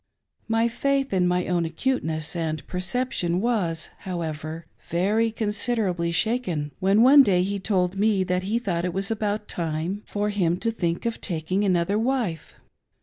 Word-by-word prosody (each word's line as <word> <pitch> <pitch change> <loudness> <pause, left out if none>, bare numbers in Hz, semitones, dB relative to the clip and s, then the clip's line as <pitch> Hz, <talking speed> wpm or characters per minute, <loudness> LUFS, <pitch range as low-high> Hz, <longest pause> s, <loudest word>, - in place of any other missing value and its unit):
My 225 +1 +2
faith 275 +1 0
in 180 -2 +3
my 180 0 +1
own 175 -2 +1
acuteness 160 - -1
and 160 -2 -3
perception 185 -2 -1
was, 190 -8 -1
however, 160 -3 -5 0.2
very 205 +7 +2
considerably 210 -5 0
shaken 180 -7 0
when 195 +4 +4
one 280 +3 +9
day 185 -8 +3
he 200 +1 -2
told 185 -2 0
me 200 -1 +2
that 180 0 0
he 205 +5 -1
thought 180 -8 -2
it 180 0 -2
was 195 +3 0
about 210 -1 -2
time 165 +4 -3
for 210 0 -1
hinj 180 -4 +1
to 230 - 0
think 170 -5 -2
of 230 -1 -2
taking 180 +2 -1
another 190 +1 +1
wife. 230 - -2
190 Hz, 155 wpm, -25 LUFS, 170-220 Hz, 0.2 s, one